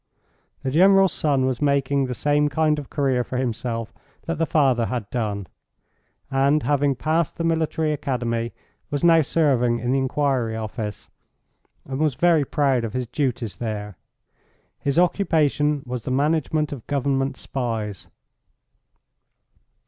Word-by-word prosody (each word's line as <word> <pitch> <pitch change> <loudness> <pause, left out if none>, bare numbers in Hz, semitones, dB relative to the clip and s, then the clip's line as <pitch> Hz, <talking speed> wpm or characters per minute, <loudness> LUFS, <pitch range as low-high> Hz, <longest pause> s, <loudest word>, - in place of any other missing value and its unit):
The 130 - -1
General's 195 +4 +5
son 140 -4 +1
was 130 0 -1
making 140 -1 +1
the 125 - -4
same 145 +5 +2
kind 155 +1 +1
of 140 - -9
career 135 -4 +1
for 125 - -5
himself 115 -2 -3 0.3
that 165 -2 -3
the 165 - +1
father 130 -7 +2
had 120 -5 -3
done, 105 -5 -2 0.9
and, 140 +3 +2
having 145 -1 +2
passed 160 +4 0
the 165 - -3
Military 160 -1 0
Academy, 120 -5 -2 0.4
was 145 +1 -3
now 165 -1 +6
serving 130 -6 +2
in 120 +2 -2
the 135 - +2
Inquiry 130 -4 0
Office, 110 -1 -5 0.7
and 135 0 -5
was 150 -4 +1
very 170 -2 +3
proud 135 -4 +1
of 110 -2 -4
his 125 -1 -2
duties 125 -4 -2
there. 105 -3 -4 0.8
His 140 +2 -1
occupation 150 -5 +2
was 125 -1 -4
the - - -4
management 150 +2 +1
of 135 -6 -8
Government 135 -1 0
spies. 110 -7 -4
135 Hz, 140 wpm, -23 LUFS, 120-150 Hz, 0.9 s, now